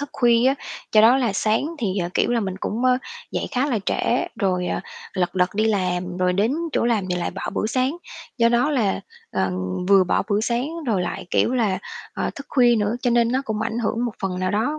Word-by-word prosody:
thức 285 - -4
khuya 240 0 +3
á. 270 - +3 0.4
Do 215 - +7
đó 230 +4 +7
là 240 -6 +1
sáng 215 +5 +1
thì, 195 -3 -1
ờ, 175 - -1
kiểu - - +2
là, 240 -1 +2
mình 190 -2 -3
cũng, 235 +4 -2
ơ, 255 0 +4 0.3
dậy - - -2
khá 260 +1 +1
là 245 -7 0
trễ - - +1
rồi, 180 -2 +1
à, - - -1 0.3
lật 180 0 -1
đật 180 -1 +3
đi 215 +1 +1
làm. 180 -4 0
Rồi 180 0 +2
đến 205 +6 +1 0.2
chỗ - - +1
làm 225 -5 +1
thì 180 - +1
lại 175 - -2
bỏ 195 - -7
bữa - - 0
sáng. 255 +6 0 0.4
Do 230 0 +5
đó 240 +5 +2
là, 225 -9 +1 0.3
ờ, 95 - 0 0.4
vừa 195 -2 +6
bỏ - - +1
bữa 205 +1 +2
sáng 240 +4 0 0.2
rồi 205 -6 +1
lại, 180 +1 -4
kiểu 255 - +2
là, 205 -7 +1 0.4
ờ, - - -1
thức 280 - -9
khuya 245 -3 +4
nữa 210 +2 0
cho 245 - +2
nên 235 0 +3
nó 265 +1 +1
cũng 220 -3 -3
ảnh 225 +1 -2
hưởng 235 +1 -1
một 235 - -2
phần 185 -1 -2
nào 185 0 0
đó 225 +10 0
220 Hz, 240 wpm, -22 LUFS, 190-245 Hz, 0.4 s, Do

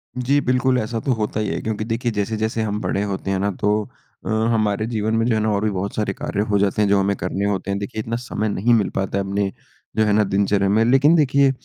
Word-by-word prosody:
जी 130 +3 +2
बिल्कुल, 130 0 +2
ऐसा 115 +1 -3
तो 130 - -1
होता 110 -2 -2
ही 105 - -1
है। - - -2
क्योंकि 110 -1 -3
देखिए 115 +2 -1
जैसे-जैसे 110 +2 -1
हम 105 -1 -2
बड़े 100 +1 -1
होते 95 -1 -3
हैं 95 - 0
ना 100 +1 0
तो 105 0 +1 0.4
अ, - - -4 0.2
हमारे 110 -1 +1
जीवन 110 -1 -1
में 115 0 +1
जो 120 -2 +2
है - - +1
ना 110 - +1
और 100 0 0
भी 110 - +2
बहुत 100 +1 -3
सारे 105 -3 -1
कार्य 100 - -3
हो 100 - +3
जाते 100 +1 +1
हैं 105 - +3
जो 100 0 +4
हमें 100 +1 +1
करने 95 +2 -2
होते 100 -1 -1
हैं। 100 - -1
देखिए 100 +2 -5
इतना 115 +2 -3
समय 110 -3 -3
नहीं 110 +4 +2
मिल 110 -3 +2
पाता 95 0 -1
है 100 - 0
अपने 100 0 -1 0.5
जो 110 - +4
है 105 - +2
ना 105 +1 +4
दिनचर्या 100 0 +1
में। 110 +3 +3
लेकिन 135 +6 +5
देखिए 140 -3 +4
105 Hz, 265 wpm, -21 LUFS, 100-115 Hz, 0.5 s, लेकिन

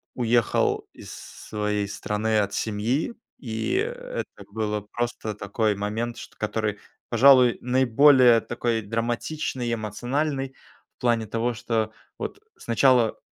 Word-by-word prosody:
уехал 120 -2 +1
из - - -11
своей 105 -1 -4
страны 105 +2 -1
от 100 -1 0
семьи. 115 - -1 0.2
И 115 - -3
это - - -4
было 105 -1 -2
просто 120 -3 -3
такой 105 +1 0
момент, 110 +4 -3
шт - - -10
который, 105 -1 -2 0.3
пожалуй, 130 -3 +6
наиболее 125 -1 +5
такой 120 -1 -1
драматичный 120 +4 -2
и - - 0
эмоциональный, 135 +6 -2 0.4
в - - -68
плане 120 -3 +1
того, 115 +3 -1
что 110 -1 -1 0.3
вот - - -5 0.2
сначала 120 -1 +3
115 Hz, 115 wpm, -25 LUFS, 110-130 Hz, 0.4 s, пожалуй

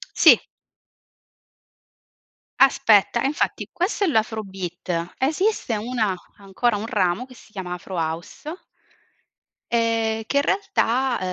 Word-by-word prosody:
Sì. - - +8 2.2
Aspetta, 230 -3 +5
e - - -1
infatti 295 - -2
questo 380 +3 -1
è - - +3
l'afro 220 -4 0
beat. 180 -2 -4
Esiste 300 - 0
una 220 -3 -1 0.3
ancora 205 +4 0
un 215 +2 -4
ramo 200 0 0
che 255 - -15
si 220 - -18
chiama 180 -3 -5
Afro 185 +1 -8
House 170 - -4 1.1
e 225 -1 +1
che 280 - 0
in 280 - +4
realtà 265 - +1
225 Hz, 115 wpm, -23 LUFS, 195-265 Hz, 2.2 s, Sì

